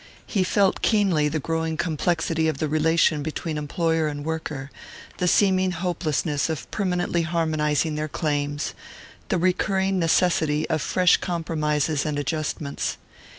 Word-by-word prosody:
He 195 -4 0
felt 195 +1 +2
keenly 190 -9 +3
the 155 +1 -1
growing 160 +1 -2
complexity 160 0 0
of 155 - -1
the 155 - -1
relation 155 0 +2
between 155 +1 -4
employer 160 +1 0
and 145 -1 -5
worker, 155 -4 -4 0.5
the 180 - 0
seeming 190 0 +3
hopelessness 160 -4 -1
of 160 -3 -3
permanently 180 -3 0
harmonizing 160 -2 0
their 150 0 -2
claims, 145 -1 -2 0.6
the - - +2
recurring 190 +2 +1
necessity 160 -3 +2
of 160 -2 +1
fresh 180 -2 +4
compromises 155 -4 -1
and 150 -2 -2
adjustments. 145 0 -2
160 Hz, 130 wpm, -24 LUFS, 150-175 Hz, 0.6 s, fresh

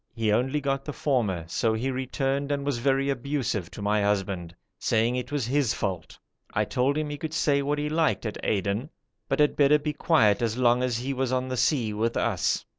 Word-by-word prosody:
He 110 -3 +1
only 130 +7 +1
got 135 -1 -1
the 150 - -5
former, 105 - 0
so 110 +5 0
he 130 +4 -1
returned 135 +2 -1
and 140 -1 -1
was 140 -4 -1
very 135 +2 +2
abusive 125 - -2
to 100 - -8
my 105 +1 +2
husband, 95 -4 -1 0.2
saying 115 +2 +1
it 125 +2 -4
was 145 -5 -1
his 135 -1 +1
fault; 90 -5 -4 0.4
I - - +2
told 135 +4 0
him 155 -1 -2
he 145 - -5
could 160 0 -4
say 140 -3 +2
what 145 +1 -1
he 145 0 -1
liked 155 -4 +1
at 105 - -4
Aden, 100 +6 -1 0.4
but 135 - +1
had 150 -1 +3
better 145 +1 +5
be 150 0 -3
quiet 120 - +3
as 115 0 0
long 120 -1 +3
as 125 -2 0
he 130 +3 -3
was 130 -1 -1
on 130 0 -1
the 130 - -2
sea 120 -4 +1
with 115 +2 -1
us. - - 0
130 Hz, 215 wpm, -26 LUFS, 110-140 Hz, 0.4 s, better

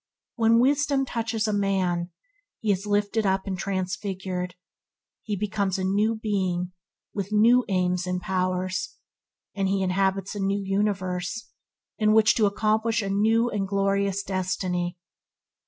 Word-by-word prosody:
When 230 -1 +4
wisdom 280 +1 +2
touches 225 -2 -2
a 215 - 0
man, 185 -4 0 0.5
he 215 - +1
is 200 +1 -2
lifted 205 +2 +1
up 190 -1 +1
and 195 - -2
transfigured. 185 -1 -3 0.7
He 210 - -3
becomes 200 -1 -1
a 190 - -2
new 205 +4 +2
being 185 -5 -1 0.4
with 200 0 -4
new 235 +4 +5
aims 180 -1 0
and 180 0 -1
powers, 185 0 -2 0.6
and 195 -2 0
he 195 0 +1
inhabits 190 +1 0
a 205 - -5
new 195 +1 0
universe 195 0 -2 0.5
in 215 -1 +4
which 220 0 +6
to 215 -3 +4
accomplish 220 +2 +1
a 195 - -2
new 225 +4 +2
and 195 -2 -1
glorious 200 0 0
destiny. 185 -2 -2
195 Hz, 140 wpm, -26 LUFS, 185-215 Hz, 0.7 s, which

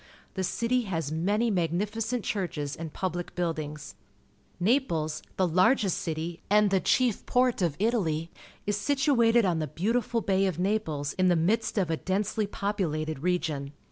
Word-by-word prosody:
The 190 - -2
city 235 +5 0
has 165 -6 -2
many 205 +8 +1
magnificent 210 +7 -1
churches 155 -8 -2
and 160 -1 -6
public 175 0 -4
buildings. 155 - -3 0.7
Kxi^les, 175 - +1 0.2
the 185 - +3
largest 185 +3 +3
city 165 +1 -4
and 210 0 +4
the 195 - +4
chief 245 +2 +2
port 250 -3 +2
of 170 -5 +1
Italy, 170 -7 0 0.3
is 205 0 0
situated 240 -3 +3
on 175 -3 +1
the 155 - -2
beautiful 230 - 0
Bay 195 -1 +2
of 185 - -2
Napjes 175 -7 -1
in 185 - +4
the 175 - +4
midst 210 +8 +1
of 180 -5 +1
a 160 - 0
densely 205 +4 -1
populated 160 -8 -2
region. 155 -5 -1
185 Hz, 150 wpm, -28 LUFS, 160-215 Hz, 0.7 s, and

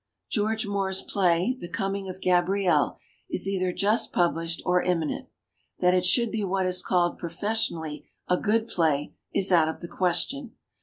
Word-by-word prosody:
* - - -58
« - - -58
George 220 0 0
Moore's 195 -1 0
play, 185 +5 +1
"The 175 - -7
Coming 195 +2 -3
of 185 +1 -8
Gabrielle", 180 +1 +2 0.3
is - - 0
either 185 -2 0
just 210 +5 +2
published 165 -1 0
or 180 0 +2
inuninent. 165 -4 -1 0.5
That 180 0 +3
it 180 0 +2
should 235 +4 +3
be 220 -2 -2
what 190 0 0
is 180 0 +1
called 175 -2 +1
professionally 170 -4 -2 0.2
a 180 - +3
"good 220 +4 0
play" 155 -8 0 0.2
is 190 0 +2
out 165 -3 +5
of 160 - -5
the 170 - -7
question. 190 +10 -1
185 Hz, 170 wpm, -26 LUFS, 175-200 Hz, 0.5 s, out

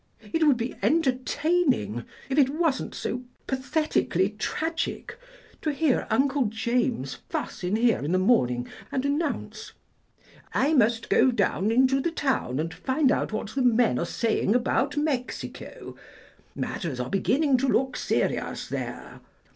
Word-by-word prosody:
It 325 -1 +3
would 275 -4 +5
be 235 +2 -3
entertaining, 275 - +1 0.2
if 270 +2 +1
it 270 -2 +5
wasn't 305 -1 -1
so 245 - -3 0.2
pathetically 260 - 0
tragic, 325 +7 -3 0.5
to 305 - 0
hear 290 -2 +1
Uncle 270 +3 +2
James 225 - -1 0.2
fuss - - -4
in 180 +3 0
here 230 0 +3
in 150 - -3
the 185 - +3
morning 125 - +2 0.2
and 265 0 -1
announce, 290 +2 -2 0.8
'I 290 +4 +3
must 235 -6 +5
just - - -12
go 265 - +5
down 205 -3 +1
into 260 +3 +3
the 340 - 0
town 270 - -1
and 165 +1 -2
find 270 +1 +1
out - - 0
what 215 -1 -3
the 270 - -1
men 240 - +3
there - - -1
are - - 0
saying 225 0 +1
about 270 +3 +1
Mexico. 285 -4 -4 0.6
Matters 150 -8 -3
are 125 - -3
beginning 270 +7 +2
to 270 +2 0
look 260 0 +1
serious - - -1
there. - - -6
255 Hz, 145 wpm, -26 LUFS, 215-285 Hz, 0.8 s, would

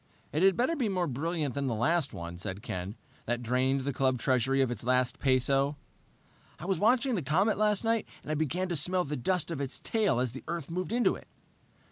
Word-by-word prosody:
"It 155 - 0
had 190 -1 +5
better 260 +8 +2
be 250 -8 0
more 185 -2 0
brilliant 155 0 -2
than 140 -1 -2
the 120 - 0
last 140 +7 +1
one," 85 0 -6
said 95 +1 -5
Ken. 95 +3 -4 0.3
"That 120 0 -1
drained 130 +3 +1
the 140 +1 -2
club 130 -1 +1
treasury 130 +1 +2
of 130 -3 +2
its 120 - -4
last 125 0 +1
peso." 135 +2 +2 0.8
"I - - -8
was 190 -3 0
watching 250 +5 +3
the 195 - 0
comet 185 +10 +2
last 210 -1 +3
night, 225 -1 +1 0.2
and - - -5
I - - +1
began 160 +5 -1
to 175 - -1
smell 180 +4 +1
the 150 -1 -3
dust 170 +6 0
of 150 -4 -3
its 135 -1 -1
tail 215 - +1
as 125 -2 0
the 135 - -8
Earth 170 -2 -4
moved 185 +3 -3
into 240 +1 +3
it...." - - -10
145 Hz, 220 wpm, -30 LUFS, 130-185 Hz, 0.8 s, had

